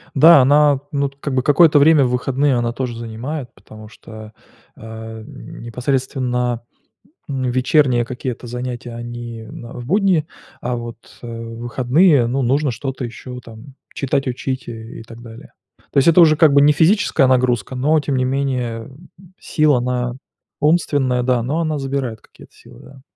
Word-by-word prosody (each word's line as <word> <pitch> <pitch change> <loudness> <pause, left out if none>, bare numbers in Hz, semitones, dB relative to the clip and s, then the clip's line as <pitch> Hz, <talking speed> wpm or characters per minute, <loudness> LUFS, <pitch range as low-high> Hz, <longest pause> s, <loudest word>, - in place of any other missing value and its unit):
Да, 160 +1 +8
она, 145 +1 +4
ну, 140 -1 0
т 140 - -20
как 140 -3 -3
бы 130 - +1
какое-то 150 0 +5
время 150 -2 +5
в 125 - 0
выходные 135 +2 0
она 120 -1 -1
тоже 120 -2 -4
занимает, 120 +3 -6
потому 110 +2 -14
что, 110 0 -12 0.4
а, 110 0 -9
непосредственно, 125 0 -3 0.7
м, 135 -2 -3
вечерние 130 -1 +2
какие-то 125 0 -6
занятия 125 0 -6
они 120 -1 -7
в 120 +1 -10
б 120 - -8
будние, 185 - +1 0.3
а 125 0 -3
вот, 120 -1 -7 0.2
э, - - -10
в 115 0 -7
выходные, 130 +3 +3
ну, 135 +3 -1
нужно 135 +2 +1
что-то 130 +1 -5
ещё 125 +1 -9
там, 115 +4 -14 0.2
читать, 135 0 -1
учить 130 0 -4
и 115 -1 -9
и - - -10
так 115 0 -13
далее. 115 -1 -13 0.4
То - - -1
есть 140 - +4
это 165 - +5
уже 155 -2 +7
как 160 -2 +5
бы 140 - +6
не 150 +1 +5
физическая 160 -4 +3
нагрузка, 125 -2 +1
но 150 +5 +2
тем 135 -2 -2
не 130 - +1
менее 125 -4 -2 0.5
сила 150 -4 +2
она 125 0 -2 0.4
умственная, 145 -6 +1
да, 125 -2 +1
но 155 +7 -1
она 155 -2 -1
забирает 135 -5 -3
какие-то - - -19
силы, - - -17
да. 135 -1 -16
125 Hz, 165 wpm, -19 LUFS, 120-140 Hz, 0.7 s, Да